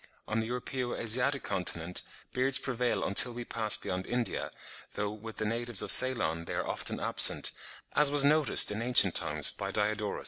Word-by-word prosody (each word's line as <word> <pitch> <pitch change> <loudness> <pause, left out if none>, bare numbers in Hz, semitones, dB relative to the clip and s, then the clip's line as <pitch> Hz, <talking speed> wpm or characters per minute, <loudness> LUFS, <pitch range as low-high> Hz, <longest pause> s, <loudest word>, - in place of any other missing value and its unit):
On 110 +1 -3
the 110 - -4
Europaeo 125 +1 -5
Asiatic 125 +5 -1
continent, 90 -1 -2 0.3
beards 130 +1 +1
prevail 125 -2 -3
until 120 +5 +5
we 120 0 -8
pass 110 -3 +2
beyond 95 0 -6
India; 120 -1 -4 0.5
though 105 0 -4
with 110 +1 -11
the 110 - -4
natives 115 -1 -3
of - - +7
Ceylon 85 -11 +2
they - - -7
are - - -4
often - - -3
absent, - - +3 0.4
as 150 -1 +3
was 145 -1 +5
noticed 150 -5 +4
in 105 +2 -5
ancient 120 +1 +3
times 75 -1 +2
by - - -7
Diodorus. 105 0 -3
115 Hz, 175 wpm, -28 LUFS, 105-125 Hz, 0.5 s, of